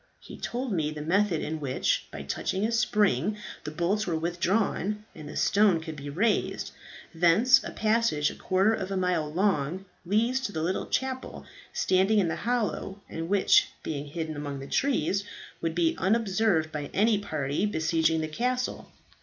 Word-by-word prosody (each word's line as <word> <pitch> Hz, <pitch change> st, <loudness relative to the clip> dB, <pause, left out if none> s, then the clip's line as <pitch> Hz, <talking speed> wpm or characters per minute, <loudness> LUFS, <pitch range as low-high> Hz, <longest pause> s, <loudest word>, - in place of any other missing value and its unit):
He -, -, -11 dB
told 245 Hz, +1 st, -4 dB
me 155 Hz, -4 st, 0 dB
the 150 Hz, -1 st, -6 dB
method 185 Hz, +1 st, +2 dB
in 160 Hz, +1 st, -3 dB
which, 135 Hz, -3 st, 0 dB
by -, -, -7 dB
touching 190 Hz, +3 st, -2 dB
a 225 Hz, -, 0 dB
spring, 215 Hz, -2 st, +2 dB, 0.3 s
the -, -, -2 dB
bolts 175 Hz, +7 st, 0 dB
were 165 Hz, -2 st, 0 dB
withdrawn 190 Hz, +4 st, 0 dB
and 155 Hz, -2 st, -9 dB
the -, -, -6 dB
stone 200 Hz, -4 st, +4 dB
could 160 Hz, -1 st, -7 dB
be 145 Hz, 0 st, -7 dB
raised. 205 Hz, +9 st, 0 dB, 0.4 s
Thence 195 Hz, +11 st, +5 dB
a -, -, -5 dB
passage 215 Hz, -9 st, +1 dB
a -, -, -10 dB
quarter 195 Hz, +4 st, +2 dB
of 190 Hz, -3 st, -3 dB
a 195 Hz, -, -2 dB
mile 180 Hz, -5 st, 0 dB
long 180 Hz, -1 st, 0 dB, 0.2 s
leads 225 Hz, +8 st, +1 dB
to 260 Hz, -6 st, -3 dB
the 160 Hz, -5 st, -3 dB
little 185 Hz, +3 st, -1 dB
chapel 260 Hz, 0 st, -3 dB, 0.3 s
standing 190 Hz, +3 st, +2 dB
in 185 Hz, -5 st, +3 dB
the -, -, -1 dB
hollow, 225 Hz, -4 st, -2 dB
and 165 Hz, +1 st, -5 dB
which, 205 Hz, -, +5 dB, 0.2 s
being 145 Hz, -2 st, -4 dB
hidden 160 Hz, +1 st, -4 dB
among 145 Hz, -1 st, -4 dB
the 135 Hz, -, -7 dB
trees, 200 Hz, -, +1 dB, 0.4 s
would 165 Hz, -1 st, -2 dB
be 170 Hz, -2 st, +2 dB
unobserved 195 Hz, -5 st, +2 dB
by 150 Hz, -2 st, -4 dB
any 210 Hz, +1 st, +3 dB
party 155 Hz, -1 st, -1 dB
besieging 160 Hz, -2 st, +1 dB
the 155 Hz, -, -2 dB
castle. 250 Hz, +10 st, -2 dB
185 Hz, 170 wpm, -28 LUFS, 160-215 Hz, 0.4 s, Thence